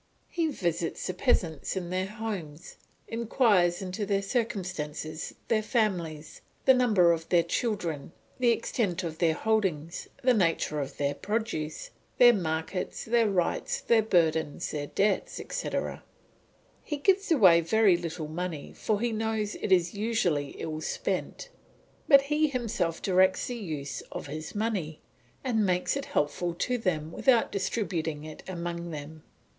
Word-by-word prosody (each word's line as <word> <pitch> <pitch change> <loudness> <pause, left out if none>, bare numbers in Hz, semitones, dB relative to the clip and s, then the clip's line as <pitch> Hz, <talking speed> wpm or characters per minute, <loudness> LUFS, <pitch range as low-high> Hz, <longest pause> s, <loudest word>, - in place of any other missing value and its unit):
He 335 -2 0
visits 170 - -2
the 185 - -2
peasants 180 - 0
in 180 -2 -4
their 185 +1 0
homes; 195 -8 -6 0.3
inquires 215 -6 +2
into 185 +3 -4
their 200 0 0
circumstances, 180 - -3
their 220 -2 +2
families, 180 -10 -1 0.2
the 265 - +8
number 215 -9 +4
of 165 -1 -2
their 175 -2 +4
children, 170 - -2 0.3
the 245 -1 +4
extent 210 -5 0
of 160 -1 -5
their 165 -2 +3
holdings, 185 -7 -1 0.2
the 255 0 +5
nature 165 -6 +1
of 140 -1 -5
their 140 0 0
produce, 205 -8 -3 0.3
their 240 -1 +8
markets, 165 -1 -3
their 230 -1 +3
rights, 180 -3 0
their 230 -2 +4
burdens, 160 -7 +1
their 145 -1 -3
debts, 200 +4 0
etc. - - -3 0.8
He 295 - -3
gives 385 +5 +2
away 185 - +7
very 200 +2 +4
little 165 -2 -4
money, 165 -1 -5
for 215 -2 -1
he 240 0 +1
knows 220 -1 -1
it - - -4
is 175 -2 +4
usually 200 -10 0
ill 155 -1 -4
spent; - - -3 0.6
but 275 -2 +8
he 300 +2 +2
himself 230 - -2
directs 185 0 +3
the 245 - -4
use 155 - -5
of - - -5
his 155 +5 -7
money, 200 -8 -2 0.4
and 235 -5 +1
makes 180 +3 +1
it 280 0 -3
helpful 175 - -1
to 250 +7 -1
them 160 -7 -1
without 240 +4 +3
distributing 170 -7 -2
it 155 0 -9
among 170 -1 -4
them. 155 0 -8
185 Hz, 145 wpm, -28 LUFS, 160-225 Hz, 0.8 s, the